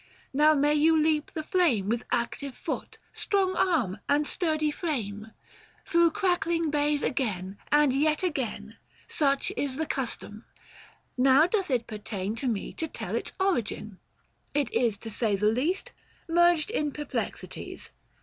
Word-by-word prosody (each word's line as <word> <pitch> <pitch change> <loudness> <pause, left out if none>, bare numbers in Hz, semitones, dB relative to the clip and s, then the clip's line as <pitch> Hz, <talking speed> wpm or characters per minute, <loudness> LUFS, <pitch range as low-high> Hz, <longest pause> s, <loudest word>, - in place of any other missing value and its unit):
Now 305 +3 +5
may 290 +1 +3
you 315 +2 +4
leap 305 -1 +1
the 315 - -5
flame 300 - +2
With 235 +2 -1
active 255 +3 -2
foot, - - -5 0.2
strong 385 -2 +1
arm, 300 - +1
and 290 +1 +3
sturdy 310 -3 0
frame, 220 - -3 0.3
— - - -27
Through 340 -1 +4
crackling 340 -5 0
bays 295 0 +1
again, 200 -8 -2
and 295 -3 +5
yet 305 +5 +1
again. 235 - -3 0.3
Such 275 -3 +1
is 275 -2 -2
the 320 +3 -1
custom, 235 -5 -4 0.8
now 270 +4 +6
doth 385 0 0
it 245 -3 +1
pertain 210 -2 -4
To 265 - -2
me 220 -5 -2
to 320 - -3
tell - - -5
its - - -3
origin: 230 - -1 0.6
It 285 -4 +1
is, 235 -4 +2
905 - - -20
To 225 - -6
say 215 -1 0
the 200 +2 -1
least, 305 - -1 0.4
merged 345 +1 +3
in 300 -10 0
perplexities. 295 +1 -5
290 Hz, 150 wpm, -28 LUFS, 230-320 Hz, 0.8 s, now